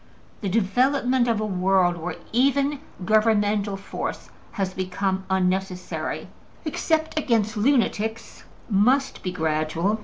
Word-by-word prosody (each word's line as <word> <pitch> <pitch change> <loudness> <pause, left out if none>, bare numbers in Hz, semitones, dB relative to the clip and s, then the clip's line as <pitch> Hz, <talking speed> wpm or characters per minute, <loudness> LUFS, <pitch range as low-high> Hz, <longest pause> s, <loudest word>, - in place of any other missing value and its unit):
The 200 - -1
development 245 +5 +2
of 230 -2 +1
a 215 - -1
world 185 -2 +2
where 170 0 -4 0.2
even 275 +3 +2 0.3
governmental 210 -1 +2
force 195 - -5 0.2
has 190 -3 -2
become 190 +1 -2
unnecessary 185 0 -1 0.4
(except 315 0 0
against 230 -6 +1
lunatics) 225 -2 0 0.2
must 250 +6 +2
be 185 - -3
gradual. 160 +4 0
205 Hz, 110 wpm, -24 LUFS, 185-245 Hz, 0.4 s, development